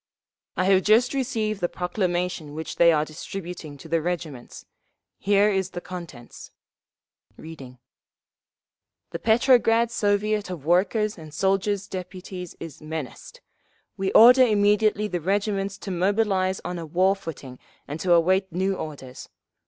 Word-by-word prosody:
"I - - +2
have 190 -1 +4
just 225 +6 +3
received 225 -6 -2
the 175 - 0
proclamation 180 -4 -2
which 160 0 -6
they 170 0 +6
are 155 -1 +1
distributing 165 -1 -8
to - - -12
the 165 -1 0
regiments. 160 -7 -5 0.5
Here 205 +2 +3
is 190 -2 -1
the 180 - -6
contents." 170 -10 -10 0.9
Reading: 135 -6 -11 1.4
_"'The - - -3
Petrograd 230 0 +3
Soviet 205 -1 0
of 170 -6 -7
Workers' 200 +4 +1
and 155 -1 -11
Soldiers' 195 +3 0
Deputies 185 -1 -8
is 160 -3 -9
menaced. 155 -4 -7 0.5
We 190 0 -2
order 250 +3 +8
immediately 210 -2 +3
the 180 -3 -3
regiments 195 +1 -1
to 200 - -7
mobilise 190 0 +1
on 180 0 -4
a 165 - -6
war 185 +5 +2
footing 140 -8 -9 0.3
and 145 +3 -6
to 175 +2 +2
await 185 +3 +2
new 190 +3 0
orders. 140 -7 -8
185 Hz, 135 wpm, -24 LUFS, 165-205 Hz, 1.4 s, order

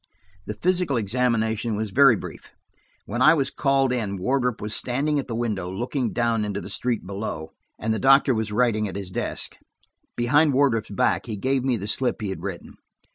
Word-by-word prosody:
The 105 - -4
physical 180 -6 +1
examination 115 0 0
was 105 -1 -3
very 135 +1 +6
brief; - - -9 0.6
when 120 +4 -3
I 155 +5 +7
was 135 -3 0
called 135 -2 +1
in 105 -5 -2
Wardrop 125 +4 0
was 105 +1 -2
standing 145 +4 0
at 135 - -4
the 115 - -4
window 105 -6 -2
looking 120 +5 -2
down 115 -2 0
into 105 -1 -3
the 100 - -8
street 120 +1 -2
below, 95 -5 -5 0.3
and 110 +1 -1
the 110 - -2
doctor 135 0 +5
was 110 -2 -2
writing 110 -1 +1
at 95 - -7
his 100 -2 -6
desk. - - -4 0.6
Behind 145 +5 +3
Wardrop's 130 -5 +2
back 100 - 0
he 110 -3 -4
gave 130 +4 0
me 130 -3 +1
the 100 - -6
slip 125 +4 0
he 105 -3 -3
had 95 - -5
written. - - -7
115 Hz, 190 wpm, -24 LUFS, 105-135 Hz, 0.6 s, I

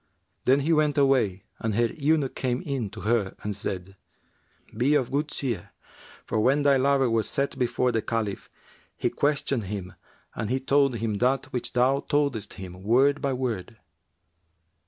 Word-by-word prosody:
Then 135 +2 +4
he 160 +4 +2
went 150 -1 +2
away 125 -9 +2 0.2
and 110 -2 -1
her 120 +2 +3
eunuch 150 -3 +1
came 125 +2 -2
in 135 - -2
to - - -9
her 105 -3 0
and 105 -1 -3
said, 95 -1 -5 0.8
'Be 130 +6 +3
of 135 -5 +1
good 145 +2 0
cheer; 130 -6 -4 0.5
for, 110 - -1
when 135 +6 +3
thy 140 -1 +5
lover 135 0 +3
was 115 -2 0
set 140 0 -1
before 125 0 +1
the 115 -1 0
Caliph, 110 -3 -3 0.5
he - - 0
questioned 140 -5 0
him 95 -2 -5 0.4
and 105 0 -3
he 130 +2 +1
told 135 -1 +2
him 110 -3 -2
that 130 +2 +1
which 125 - -2
thou 130 +3 +3
toldest 140 -8 -1
him, 90 -1 -9
word 135 +7 +3
by 140 - 0
word.' 120 -4 -3
125 Hz, 165 wpm, -26 LUFS, 110-140 Hz, 0.8 s, thy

